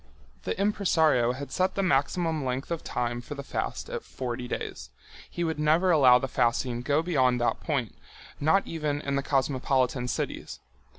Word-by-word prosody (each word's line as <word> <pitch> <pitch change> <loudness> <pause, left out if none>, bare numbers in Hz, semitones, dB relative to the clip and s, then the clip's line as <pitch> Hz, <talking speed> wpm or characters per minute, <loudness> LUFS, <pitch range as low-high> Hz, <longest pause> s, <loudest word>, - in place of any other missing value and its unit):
The - - -2
impresario 160 - +2
had 140 +2 -7
set 185 +1 0
the 195 - 0
maximum 160 0 +1
length 130 +4 -3
of 170 - -2
time 120 0 -2
for 145 - -8
the 140 - -6
fast - - -4
at - - -5
forty 125 -1 -5
days—he 175 - -7
would 160 -2 -2
never 160 +5 +3
allow 130 -6 +7
the 135 - -2
fasting 120 0 0
go 140 +3 +1
on 160 - +2
beyond 130 -8 +2
that 120 - +1
point, 135 - -2 0.5
not 160 +7 +3
even 150 -3 -2
in 140 -1 -2
the 140 - +1
cosmopolitan 130 -2 0
cities. - - -4
140 Hz, 170 wpm, -27 LUFS, 125-160 Hz, 0.5 s, allow